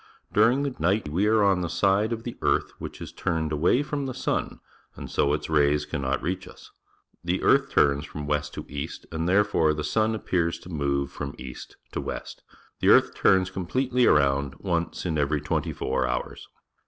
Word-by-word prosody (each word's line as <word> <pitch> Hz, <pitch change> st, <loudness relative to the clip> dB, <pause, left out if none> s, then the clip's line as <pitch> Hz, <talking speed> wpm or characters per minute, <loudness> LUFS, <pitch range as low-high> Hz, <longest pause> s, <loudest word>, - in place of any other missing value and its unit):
During 120 Hz, +6 st, +4 dB
the 140 Hz, -2 st, -2 dB
night 90 Hz, +1 st, +1 dB
we 95 Hz, +8 st, +1 dB
are 110 Hz, -1 st, +4 dB
on 95 Hz, -2 st, +3 dB
the 85 Hz, -, -2 dB
side 100 Hz, +5 st, +2 dB
of 115 Hz, -1 st, -3 dB
the 120 Hz, -, -6 dB
earth -, -, +1 dB
which -, -, -7 dB
is -, -, -7 dB
turned 80 Hz, -1 st, -1 dB
away 85 Hz, -, +2 dB
from 145 Hz, -2 st, -3 dB
the 130 Hz, -, -5 dB
sun. 130 Hz, -, -2 dB, 0.4 s
and -, -, -8 dB
so 70 Hz, -, +2 dB
its 75 Hz, -, -1 dB
rays 75 Hz, -1 st, +2 dB
cannot 70 Hz, -2 st, -2 dB
reach 90 Hz, +2 st, -3 dB
us. -, -, -14 dB, 0.5 s
The 90 Hz, +2 st, -1 dB
earth -, -, +4 dB
turns 70 Hz, 0 st, +2 dB
fro 75 Hz, -, -7 dB
m 70 Hz, -, -6 dB
west_to 75 Hz, 0 st, -2 dB
east, 70 Hz, -1 st, -6 dB
and, 80 Hz, +1 st, -2 dB
therefore, 95 Hz, -6 st, +3 dB
the 75 Hz, -, -3 dB
sun 110 Hz, +6 st, +1 dB
appears 85 Hz, -5 st, -1 dB
to 90 Hz, -, -12 dB
move 70 Hz, -4 st, -1 dB
from 70 Hz, -1 st, -6 dB
east 65 Hz, -1 st, -9 dB
to -, -, -3 dB
west. -, -, -6 dB, 0.4 s
The -, -, +3 dB
earth -, -, +6 dB
turns 95 Hz, 0 st, +3 dB
completely 125 Hz, +7 st, +1 dB
around 70 Hz, -1 st, +3 dB
once 85 Hz, -3 st, -2 dB
in 80 Hz, -3 st, 0 dB
every 75 Hz, +1 st, +1 dB
twentv 75 Hz, -, -2 dB
four 65 Hz, -, -1 dB
hours. -, -, -4 dB
85 Hz, 190 wpm, -26 LUFS, 75-105 Hz, 0.5 s, earth